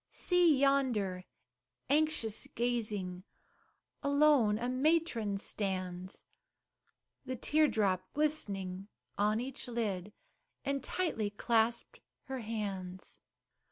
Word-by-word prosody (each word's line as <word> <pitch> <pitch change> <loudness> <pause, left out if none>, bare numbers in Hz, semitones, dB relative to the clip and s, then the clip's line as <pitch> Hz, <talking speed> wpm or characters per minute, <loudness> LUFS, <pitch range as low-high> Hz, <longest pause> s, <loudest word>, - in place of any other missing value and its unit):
See 350 -5 +3
yonder, 245 -10 +1 0.6
anxious 285 -7 +1
gazing, 210 -7 -1 0.8
Alone 280 -7 +4
a 240 +2 -2
matron 255 -6 +1
stands, 185 -2 -4 1.0
The 260 -1 -4
tear 305 +5 +3
drop 190 -7 0
glistening 200 -11 -1 0.3
on 210 +2 +3
each 260 +2 -4
lid, 210 -5 -2 0.5
And 275 -1 -1
tightly 270 - -1
clasped 230 +2 0 0.2
her 265 -1 -5
hands. 200 -5 -5
225 Hz, 90 wpm, -33 LUFS, 195-275 Hz, 1.0 s, Alone